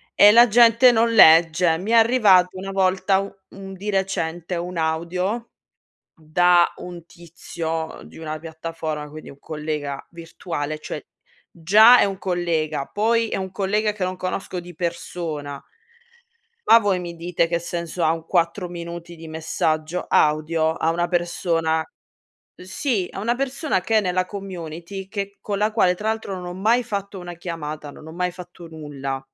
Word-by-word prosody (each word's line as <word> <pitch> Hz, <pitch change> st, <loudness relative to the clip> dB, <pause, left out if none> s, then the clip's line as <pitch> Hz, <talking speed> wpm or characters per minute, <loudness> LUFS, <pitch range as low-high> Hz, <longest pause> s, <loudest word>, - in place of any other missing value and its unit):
e 205 Hz, -, +8 dB
la 235 Hz, +2 st, +7 dB
gente 235 Hz, +2 st, +6 dB
non 230 Hz, 0 st, +2 dB
legge. 165 Hz, -3 st, +6 dB
Mi 200 Hz, +5 st, -4 dB
è -, -, +4 dB
arrivato 215 Hz, -6 st, +4 dB
una 195 Hz, +1 st, -6 dB
volta 190 Hz, 0 st, +2 dB
u 195 Hz, 0 st, -5 dB, 0.2 s
un 195 Hz, 0 st, -10 dB
di 195 Hz, +2 st, -6 dB
recente 180 Hz, -3 st, -2 dB
un 175 Hz, +1 st, -5 dB
audio 180 Hz, +8 st, -2 dB, 0.7 s
da 175 Hz, +2 st, +3 dB
un 175 Hz, -2 st, -9 dB
tizio 165 Hz, -1 st, -6 dB
di -, -, -14 dB
una 155 Hz, -1 st, -5 dB
piattaforma, 160 Hz, -2 st, -6 dB
quindi 155 Hz, +1 st, -10 dB
un 140 Hz, -, -15 dB
collega 150 Hz, -2 st, -5 dB
virtuale, 165 Hz, -3 st, -5 dB
cioè, -, -, -6 dB, 0.5 s
già 215 Hz, +9 st, +6 dB
è -, -, +5 dB
un 195 Hz, -1 st, -3 dB
collega, 165 Hz, -6 st, -1 dB
poi 230 Hz, +2 st, +1 dB
è -, -, -2 dB
un 190 Hz, -1 st, -5 dB
collega 210 Hz, +2 st, 0 dB
che 205 Hz, -2 st, -8 dB
non 185 Hz, 0 st, -3 dB
conosco 185 Hz, 0 st, -4 dB
di 175 Hz, 0 st, -12 dB
persona 160 Hz, -4 st, -5 dB, 1.1 s
ma 230 Hz, -, +8 dB
voi 200 Hz, -4 st, 0 dB
mi 175 Hz, -1 st, -7 dB
dite 170 Hz, 0 st, -1 dB
che 170 Hz, 0 st, -1 dB
senso 170 Hz, 0 st, -4 dB
ha 160 Hz, -, +4 dB
un 165 Hz, 0 st, -5 dB
4 175 Hz, +2 st, 0 dB
minuti 170 Hz, 0 st, -8 dB
di 165 Hz, 0 st, -11 dB
messaggio 155 Hz, +1 st, -2 dB
audio 155 Hz, +1 st, +2 dB
a 160 Hz, -, -1 dB
una 175 Hz, +1 st, 0 dB
persona 170 Hz, -2 st, 0 dB, 0.7 s
sì, 190 Hz, +2 st, -2 dB
a -, -, -9 dB
una 230 Hz, +4 st, 0 dB
persona 275 Hz, -, -1 dB
che 220 Hz, +4 st, 0 dB
è -, -, +4 dB
nella 185 Hz, -2 st, -1 dB
community 185 Hz, -1 st, -7 dB
che 200 Hz, -1 st, -5 dB
con 200 Hz, -1 st, -3 dB
la 210 Hz, +1 st, +1 dB
quale 185 Hz, -5 st, +2 dB
tra 210 Hz, -, -6 dB
l'altro 220 Hz, -3 st, -3 dB
non 180 Hz, -, -7 dB
ho 175 Hz, -, -6 dB
mai 225 Hz, +6 st, +2 dB
fatto 200 Hz, -3 st, -5 dB
una 175 Hz, -1 st, -8 dB
chiamata, 155 Hz, -4 st, -6 dB
non 155 Hz, -, -14 dB
ho 160 Hz, -, -9 dB
mai 180 Hz, +1 st, -1 dB
fatto 175 Hz, -1 st, -12 dB
nulla. 140 Hz, -4 st, -6 dB
175 Hz, 165 wpm, -22 LUFS, 160-195 Hz, 1.1 s, e